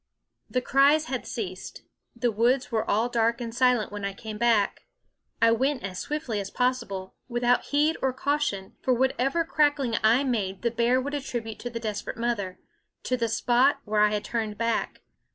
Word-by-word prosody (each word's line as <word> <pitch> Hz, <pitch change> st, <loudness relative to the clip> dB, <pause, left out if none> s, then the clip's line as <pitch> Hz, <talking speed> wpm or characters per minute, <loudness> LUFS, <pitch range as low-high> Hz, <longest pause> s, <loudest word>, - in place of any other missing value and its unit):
The 255 Hz, -1 st, -1 dB
cries 285 Hz, +4 st, +4 dB
had 260 Hz, -4 st, -4 dB
ceased; 190 Hz, -5 st, -6 dB, 0.3 s
the 240 Hz, 0 st, 0 dB
woods 245 Hz, +5 st, +1 dB
were 220 Hz, -1 st, -1 dB
all 220 Hz, +3 st, +2 dB
dark 235 Hz, 0 st, +1 dB
and 230 Hz, -2 st, -5 dB
silent 245 Hz, -4 st, +2 dB
when 205 Hz, -1 st, -6 dB
I 200 Hz, 0 st, -2 dB
came 215 Hz, +1 st, -8 dB
back. 230 Hz, -4 st, +2 dB, 0.5 s
I 230 Hz, 0 st, +5 dB
went 260 Hz, +3 st, +1 dB
as 185 Hz, -2 st, -5 dB
swiftly 295 Hz, -8 st, -3 dB
as 195 Hz, -1 st, -4 dB
possible 235 Hz, -7 st, -2 dB
without 240 Hz, 0 st, +1 dB
heed 300 Hz, +3 st, +2 dB
or 265 Hz, -, +2 dB
cau 285 Hz, +3 st, 0 dB
tion; 200 Hz, -10 st, -3 dB
for 255 Hz, -, +2 dB
whatever 265 Hz, +5 st, +1 dB
crackling 290 Hz, -7 st, +1 dB
I 230 Hz, +5 st, +5 dB
made 205 Hz, -7 st, -2 dB
the 235 Hz, -, +1 dB
bear 235 Hz, +2 st, +2 dB
would 285 Hz, +3 st, -4 dB
attribute 240 Hz, -6 st, -4 dB
to 245 Hz, -, -5 dB
the 230 Hz, -1 st, -5 dB
desperate 215 Hz, -2 st, -4 dB
mother 215 Hz, -6 st, -2 dB, 0.5 s
to 255 Hz, -, 0 dB
the 235 Hz, -2 st, 0 dB
spot 250 Hz, +5 st, +3 dB
where 210 Hz, 0 st, +1 dB
I 210 Hz, 0 st, +5 dB
had 210 Hz, 0 st, -1 dB
turned 215 Hz, -1 st, -3 dB
back. 230 Hz, 0 st, -1 dB
235 Hz, 185 wpm, -26 LUFS, 215-260 Hz, 0.5 s, I